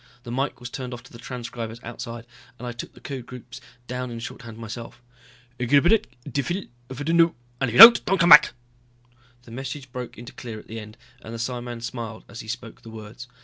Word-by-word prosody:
The 120 - -7
mike 135 +3 -2
was 125 -1 -8
turned 125 -1 -5
off 115 - -12
to 135 - -17
the 115 - -11
transcribers 120 -2 -6
outside, 115 0 -7 0.3
and 125 - -8
I - - -3
took 120 - -8
the - - -14
code 130 -4 -7
groups 125 -1 -10 0.2
down 125 +1 -4
in 120 - -6
shorthand 115 0 -8
myself. 115 +1 -8 0.3
"... 120 +1 -29
xybb 145 - +4 0.2
dfil 145 +8 -2 0.2
fdno, 165 +5 +2 0.2
and 135 - +1
if - - -5
you - - +3
don't 230 +2 +12
don't 195 - +1
come 170 -1 +4
back!" - - +10 0.9
The 120 - -14
message 135 +2 -6
broke 125 -3 -7
into 120 +4 -10
clear 115 -3 -7
at - - -12
the 115 +1 -7
end 110 +1 -11 0.2
and 115 0 -8
the - - -5
psiman 120 0 -4
smiled 115 -2 -6
as 115 - -10
he - - -9
spoke 115 0 -7
the 115 - -12
words. 110 +3 -10
120 Hz, 210 wpm, -24 LUFS, 115-135 Hz, 0.9 s, don't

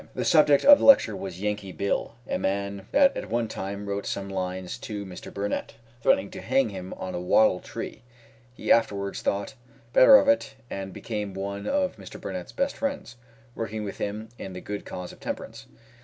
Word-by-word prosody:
The - - -2
subject 150 -4 +5
of 290 0 +10
the - - -2
lecture 190 - +7
was 95 -2 -6
"Yankee 105 -2 -2
Bill," 100 +4 -2
a - - -1
man 100 0 -2
that 280 -1 +5
at - - -5
one 115 0 0
time 100 -1 -5
wrote 100 0 -3
some 100 0 -3
lines 95 -1 -4
to 105 -2 -5
Mr. 90 -2 -9
Burnett, 100 +3 -3 0.3
threatening 100 -4 +2
to - - -8
hang 130 0 +2
him 95 -2 -7
on 95 - -6
a - - -2
wattle 90 +1 +4
tree. - - -7 0.5
He - - -2
afterwards 100 -4 +2
thought 100 0 -1 0.4
better 275 - +9
of 280 - +6
it, 285 0 +2 0.2
and 95 0 -5
became 105 -1 -5
one 100 +1 -4
of 285 -1 0
Mr. - - -10
Burnett's - - -6
best 275 +1 -1
friends, 280 - -3 0.4
working 110 -2 -4
with 100 - -6
him 105 +2 -4
in 95 - -6
the 90 - -6
good 105 0 -5
cause 90 -1 -6
of - - -15
temperance. - - -6
100 Hz, 190 wpm, -26 LUFS, 95-115 Hz, 0.5 s, of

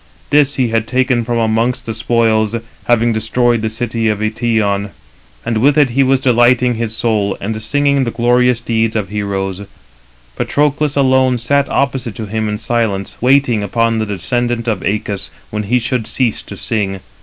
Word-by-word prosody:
This 145 -1 +3
he 125 -3 +1
had 115 0 0
taken 130 -2 +1
from 120 +1 -2
amongst 115 +3 0
the 115 - -3
spoils, 110 -2 +1 0.3
having 120 -1 +2
destroyed 120 +1 +1
the 110 - -1
city 115 0 -2
of 105 -1 +1
Eëtion, 110 -2 0 0.6
and 115 -1 0
with 140 +5 +3
it 145 -5 +4
he 135 +3 +2
was 135 0 +3
delighting 125 0 +3
his 115 -1 -3
soul, 105 -4 0
and 110 +2 -4
singing 140 +4 +1
the 120 - -1
glorious 120 +1 +2
deeds 115 -1 0
298 110 - +1
of 95 -3 -5
heroes. 100 -2 -3 0.7
Patroclus 145 0 0
alone 130 -2 +3
sat 140 +4 +1
opposite 130 -4 -1
to 110 - -5
him 110 +1 -2
in 105 - -2
silence, 110 -4 -2
waiting 125 -3 +3
upon 115 +2 0
the 110 - -2
descendant 120 +5 -2
of 110 -4 0
Æacus 100 0 -3 0.2
when 105 - -2
he 125 - +3
should 120 -1 -2
cease 125 -5 -1
to - - -10
sing. 100 -4 -2
115 Hz, 175 wpm, -16 LUFS, 110-125 Hz, 0.7 s, it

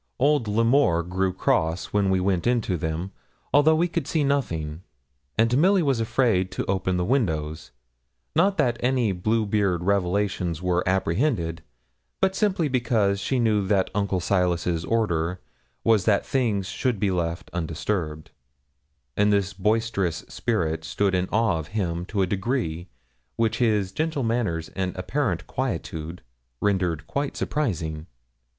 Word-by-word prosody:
Old 140 -2 +2
L'Amour 115 -4 +3
grew 95 +2 -1
cross 80 -1 0
when 100 -2 +2
we 95 -1 +2
went 90 +1 0
into 120 -6 +1
them, 80 +3 -3 0.4
although 150 +2 +6
we 170 +3 +2
could 165 -4 -3
see 155 -3 +1
nothing; 85 - -1 0.6
and 115 +2 +3
Milly 185 +5 +4
was 135 -5 +1
afraid 115 -5 +1
to - - -2
open 95 -1 0
the 90 - 0
windows 80 - -1 0.7
not 190 +5 +3
that 120 -6 +2
any 125 -4 +1
Bluebeard 100 -2 0
revelations 95 -3 0
were 90 0 0
apprehended, 95 - 0 0.6
but 190 - +2
simply 190 -7 +1
because 115 -6 +1
she 130 - -1
knew 105 -5 +2
that 95 -2 +1
Uncle 100 -2 0
Silas's 85 -2 0
order 90 -6 0 0.4
was 110 -4 +3
that 100 -2 +3
things 110 -8 0
should 125 -2 -1
be 100 -1 +1
left 85 -2 -2
undisturbed; 80 -1 -3 0.8
and 105 0 +3
this 100 -1 +1
boisterous 100 -4 0
spirit 80 -9 -1
stood 100 +3 0
in 90 0 0
awe 110 -6 +2
of 75 - -7
him 85 -3 -1
to 100 -2 0
a - - +3
degree 95 -4 -2 0.5
which 115 -1 0
his 105 -6 +2
gentle 155 +3 -1
manners 110 -9 -1
and 95 -1 -3
apparent 95 - -1
quietude 85 -9 -4 0.4
rendered 90 -5 0
quite 140 0 -3
surprising. 80 - -2
100 Hz, 140 wpm, -25 LUFS, 90-120 Hz, 0.8 s, although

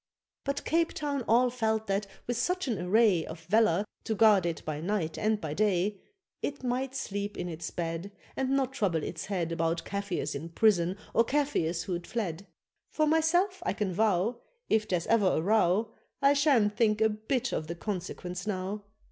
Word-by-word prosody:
But 280 0 -2
Cape 330 +1 +1
Town 285 -3 -2
all 245 +2 +4
felt 220 -3 0
that, 195 0 -1 0.2
with 245 - -1
such 360 +8 0
an 225 -7 -1
array 190 -2 +4
Of 160 +1 -8
valour 200 +1 +3 0.2
to 220 - -1
guard 205 -5 +5
it 165 - -4
by 155 -1 -3
night 170 -3 -1
and 215 0 +1
by 155 -5 -4
day, 200 +1 +1 0.4
It 285 -2 -4
might 255 +2 -1
sleep 205 -5 -3
in 180 - -3
its 165 -1 -5
bed, 165 +3 -4 0.2
And 265 -1 -1
not 270 -1 +1
trouble 185 - 0
its 165 - -5
head 180 -5 -2
About 165 0 -1
Kafirs 200 -7 -2
in 155 +4 -5
prison, 180 -1 +3 0.2
or 230 - +5
Kafirs 230 - 0
who'd 175 -2 -4
fled. 200 -5 -3 0.4
For 310 - +2
myself 345 +5 +2
I 385 - 0
can 200 -4 -2
vow, 215 +3 +1 0.3
If 215 -1 +2
there's 180 -4 0
ever 225 -4 +3
a - - +1
row, 210 +3 +2 0.3
I 275 +1 +5
sha'n't 270 -8 +3
think 215 -1 +2
a 220 - +5
bit 230 +4 -1
of 155 - -2
the 170 - -4
consequence 180 0 -5
now. 195 +1 -2
210 Hz, 180 wpm, -29 LUFS, 175-240 Hz, 0.4 s, guard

